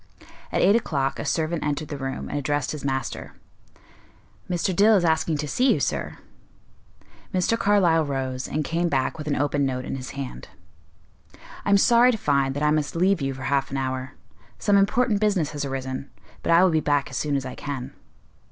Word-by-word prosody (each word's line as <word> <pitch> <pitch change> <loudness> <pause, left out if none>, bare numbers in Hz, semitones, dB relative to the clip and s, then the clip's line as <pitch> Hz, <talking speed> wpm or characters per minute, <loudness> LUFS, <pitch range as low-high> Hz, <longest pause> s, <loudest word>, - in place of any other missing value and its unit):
At - - +1
eight 200 - +5
o'clock 140 -12 -1
a - - -4
servant 160 0 -1
entered 150 0 -2
the 145 - -4
room 135 0 -4
and - - -5
addressed 145 -1 -1
his 150 - -6
master. 135 -2 -3 1.2
"Mr. 180 +1 0
Dill 215 +3 +6
is 180 -3 +2
asking 160 -1 +1
to 150 +1 -3
see 255 - +2
you, - - +2
sir." - - -2 1.1
Mr. 185 +4 +1
Carlyle 195 -7 +3
rose, 130 -3 -3
and 150 0 -2
came 170 +1 0
back 135 +2 -1
with 155 - -6
an 145 - +1
open 145 0 0
note 130 -1 -2
in - - -4
his 130 0 -7
hand. 125 - -6 1.2
"I - - 0
am 200 - +6
sorry 240 +4 +5
to 230 - -2
find 140 -6 +1
that 145 - -2
I 150 - +3
must 150 0 -1
leave 185 0 +2
you 135 -1 -2
for 135 - -8
half 140 -1 0
an 135 - -3
hour; 130 0 -3 0.4
some 205 - +2
important 210 +2 +3
business 195 -8 +1
has 145 -1 -3
arisen, 135 0 -4 0.3
but - - -1
I 170 +2 +6
will 185 - +4
be 160 - +2
back 145 -3 0
as 125 - -4
soon 145 -2 -1
as 135 -1 -1
I 130 - -5
can." 140 -3 -6
150 Hz, 200 wpm, -24 LUFS, 135-175 Hz, 1.2 s, Dill